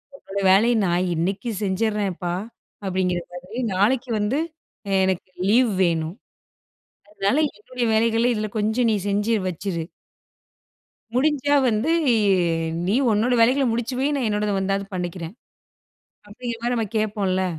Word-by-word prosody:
உங்களோட 200 -6 -5
வேலைய 230 +5 +5
நான் 175 +1 +1
இன்னக்கி 195 +8 -2
செஞ்சிரேன்ப்பா, 195 -3 -1 0.5
அப்பிடிங்கிற 185 -2 0
மாரி 185 +8 -6
நாளைக்கு 240 +6 +2
வந்து, 215 +8 0 0.5
அ - - -2
எனக்கு 190 -1 -1 0.2
லீவ் 240 +1 +4
வேணும். 165 0 0 0.9
அதனால 205 +5 0 0.2
என்னுடைய 245 +3 -4
வேலைகள 225 +1 +2
இதில 215 -1 -2
கொஞ்சம் 220 +3 +1
நீ 215 - +2
செஞ்சு 205 +3 +1
வச்சுரு. 180 -1 -3 1.3
"முடிஞ்சா 285 +1 +2
வந்து, 230 +7 +1 1.0
நீ 195 - +1 0.2
உன்னோட 225 +4 +2
வேலைகள 260 +4 +4
முடிச்சு 240 +2 -2
வை, 270 - +2
நான் 255 -5 0
என்னோடத 210 -1 0
வந்தாவது 195 +1 -1
பண்ணிக்கிறேன்." 175 0 -4 0.9
அப்பிடிங்கிற 230 +2 -6
மாரி 245 +1 +1
நம்ம 225 -2 0
கேப்போம்ல. 200 -3 0
210 Hz, 125 wpm, -23 LUFS, 190-235 Hz, 1.3 s, வேலைய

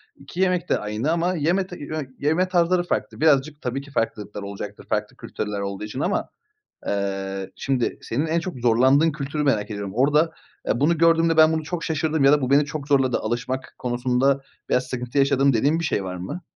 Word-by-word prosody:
2 140 +6 -11
yemek 180 -2 +1
de - - +2
aynı 105 +8 -2
ama 175 +2 +1
yeme 175 +5 +1
ta 180 - -9
i - - -12
yö 155 +2 -4 0.2
yeme 160 +6 +2
tarzları 175 0 +2
farklı. 175 - -3
Birazcık, 150 -1 +3
tabii 125 +2 -3
ki, 145 - -14
farklılıklar 105 -5 -3
olacaktır 100 +1 -7
farklı - - -1
kültürler 105 -1 -4
olduğu 100 0 -4
için 110 +5 -6
ama, 185 +6 -1 0.6
eee, 95 -1 -2
şimdi 130 -3 -1
senin 140 +8 -1
en 165 +2 +1
çok 175 -6 -6
zorlandığın 130 +6 +4
kültürü 150 0 -3
merak 110 -7 +1
ediyorum. 100 -2 -5
Orada, 150 +6 +3 0.4
eee, 120 - 0
bunu 160 +3 +3
gördüğümde 165 0 +4
ben 160 0 +6
bunu 160 0 -1
çok 165 +1 -4
şaşırdım 160 -3 0
ya 140 - +7
da 150 - +4
bu 130 - -1
beni 140 +2 +5
çok 150 -1 -6
zorladı 135 -3 +3
alışmak 125 +4 -3
konusunda 125 +2 +1 0.3
veya 125 - +4
sıkıntı 125 +1 -4
yaşadım 140 0 +4
dediğin 140 +7 +2
bir - - -3
şey 105 -10 -1
var 90 -1 -5
mı? 95 - -6
140 Hz, 200 wpm, -23 LUFS, 120-160 Hz, 0.6 s, ya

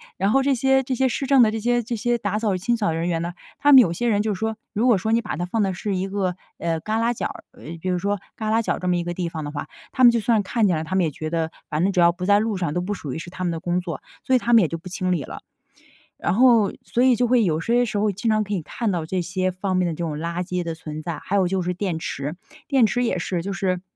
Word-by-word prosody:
然 195 +3 +1
后 270 - +4
这 275 0 +2
些 265 +2 +3
这 260 0 -3
些 260 +1 +2
市 270 +3 -3
政 270 -3 +6
的 215 - +3
这 220 - -3
些 240 +2 +1
这 235 +2 -5
些 240 +2 0
打 205 -1 -2
扫、 215 -4 0
清 230 +6 0
扫 185 -7 0
人 165 +2 -1
员 165 -1 0
呢， 175 +1 -4 0.2
他 290 0 +5
们 265 - +11
有 175 - +2
些 240 +8 -1
人 205 -3 +2
就 215 -1 0
是 185 - -7
说， 220 0 -1 0.2
如 225 +3 +1
果 230 - +5
说 220 +4 -2
你 230 +1 +3
把 215 - -4
它 175 - -3
放 220 +5 -1
的 195 -2 +1
是 195 +3 -3
一 190 +1 -2
个， 190 -2 -2 0.2
呃， 165 -1 -1
旮 215 +6 -1
旯 235 +1 +2
角 - - -4
儿， - - -6
呃， - - -17 0.2
比 185 - -2
如 180 -1 0
说 200 +2 -1 0.2
旮 215 -1 -3
旯 225 +1 +3
角 - - -1
儿 - - -8
这 180 - -4
么 180 - +2
一 175 - -1
个 175 - -3
地 175 -1 -3
方 160 -2 -5
的 145 - -5
话， 145 -1 -5 0.2
他 255 - +4
们 240 - +9
就 235 -1 0
算 230 0 +2
是 - - +2
看 220 +2 +1
见 175 -4 +1
了， 160 - -3
他 175 +4 -3
们 190 - +3
也 160 - 0
觉 155 +2 -5
得 165 -1 -1 0.2
反 150 +2 0
正 195 - +2
只 185 - 0
要 170 0 +5
不 180 +1 -5
在 205 +1 +5
路 220 0 -1
上 170 -6 -2
都 180 - 0
不 185 +4 -2
属 150 -8 -6
于 145 - -4
是 175 - -8
他 185 +1 -6
们 175 - 0
的 165 - -3
工 175 +2 -1
作， 170 -3 -6 0.2
所 260 - 0
以 255 - +5
他 240 0 0
们 230 - +8
也 170 - +1
就 165 - -3
不 175 - -12
清 185 0 -2
理 170 -5 +1
了。 - - -9 0.8
然 - - 0
后 230 -4 +5
所 240 - -1
以 255 -1 +5
就 245 - +1
会 240 -1 +3
有 160 -4 +1
些 240 +7 +2
时 215 -3 -2
候 210 0 +2
经 205 +4 -2
常 215 -1 +2
可 205 - -5
以 190 - -1
看 220 +7 -3
到 170 -4 -2
这 185 +1 -1
些 185 +1 -1
方 185 +1 -2
面 185 -1 +2
的 165 - -2
这 170 - -4
种 150 -2 -4
垃 170 +2 -2
圾 180 0 -2
的 165 -2 -4
存 155 -1 -7
在。 165 -1 -4
还 200 - -2
有 190 -2 +3
就 185 0 -1
是 180 +1 -1
电 180 -2 -2
池， 145 -1 -4 0.3
电 270 -5 +4
池 245 +3 0
也 230 -6 0
是 175 0 -2
就 195 +4 -4
是， 185 -2 -1
190 Hz, 355 characters per minute, -23 LUFS, 175-225 Hz, 0.8 s, 们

